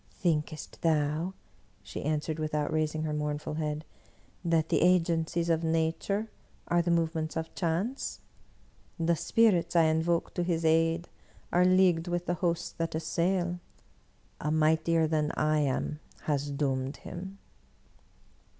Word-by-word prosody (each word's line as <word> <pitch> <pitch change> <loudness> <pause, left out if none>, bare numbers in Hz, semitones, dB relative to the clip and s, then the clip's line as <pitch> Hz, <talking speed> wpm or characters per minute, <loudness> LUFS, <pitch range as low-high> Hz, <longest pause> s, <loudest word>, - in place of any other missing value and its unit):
"Thinkest 155 -2 -2
thou," 160 +3 +1 0.5
she - - -6
answered 155 +1 -1
without 155 0 -1
raising 155 0 0
her 155 -1 -2
mournful 150 0 -2
head, 150 0 -3 0.6
"that 165 -2 +1
the.» - - +2
Agencies 170 -1 +2
of 165 -1 +1
Nature 165 +6 0 0.4
are 175 0 +3
the 170 - -2
movements 160 -1 0
of 160 0 -4
chance? 190 +9 -2 0.8
The 170 +1 +2
Spirits 180 -3 +2
I 165 - +6
invoked 160 +2 +1
to 175 - +2
his 170 -2 0
aid 165 +1 +3 0.5
are 180 +1 +5
leagued 185 -2 +4
with 175 0 -1
the 175 - 0
hosts 170 -2 0
that 165 -1 -1
assail. 175 +2 0 0.8
A 150 - -2
mightier 160 +1 +3
than 155 -1 +1
I 155 0 +2
am 145 +1 -1 0.2
has 145 -1 -1
doomed 135 -1 -1
him 190 +3 -8
165 Hz, 130 wpm, -29 LUFS, 155-175 Hz, 0.8 s, I